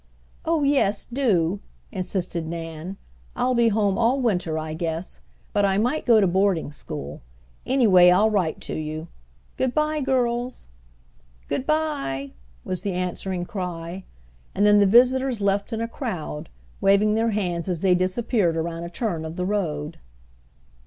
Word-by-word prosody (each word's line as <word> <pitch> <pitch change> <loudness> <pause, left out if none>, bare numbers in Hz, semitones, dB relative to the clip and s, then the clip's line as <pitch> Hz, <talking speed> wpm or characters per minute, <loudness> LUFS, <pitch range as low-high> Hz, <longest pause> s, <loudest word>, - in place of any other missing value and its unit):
"Oh 325 -2 +1
yes, 270 -8 +2
do!" 205 -8 +1 0.3
insisted 180 -3 -3
Nan. 165 +2 -6 0.4
"I'll 255 - +1
be 235 -1 +4
home 210 -2 +1
all 240 +4 +3
winter 180 -10 0
I 155 0 -4
guess, 165 +1 -4 0.3
but 205 - +2
I 195 -1 +2
might 245 +9 0
go 230 -2 +7
to 200 - +4
boarding 185 -4 +1
school. 75 - -7 0.5
Anyhow, 240 -8 +4 0.2
I'll 220 - +4
write 185 -6 0
to - - -5
you. 155 +1 -5 0.5
Good 260 -1 0
bye, 305 0 +1
girls!" 250 - -1 0.8
"Good 265 - -2
bye!" 285 - -1 0.3
was 185 - -3
the 200 -2 -2
answering 180 0 -2
cry, 180 -2 -5 0.5
and 200 - +3
then 210 0 +6
the 200 - +5
visitors 250 +3 +4
left 200 +2 0
in 225 0 -2
a 230 - -1
crowd, 185 - -5 0.3
waving 200 +2 +4
their 225 +1 +2
hands 180 -5 -2
as 175 -3 -2
they 190 -2 +4
disappeared 185 -1 +1
around 165 +1 -3
a 170 - -5
turn 175 -4 -3
of 160 +1 -6
the 180 - -2
road. 165 -6 -2
195 Hz, 150 wpm, -24 LUFS, 170-235 Hz, 0.8 s, go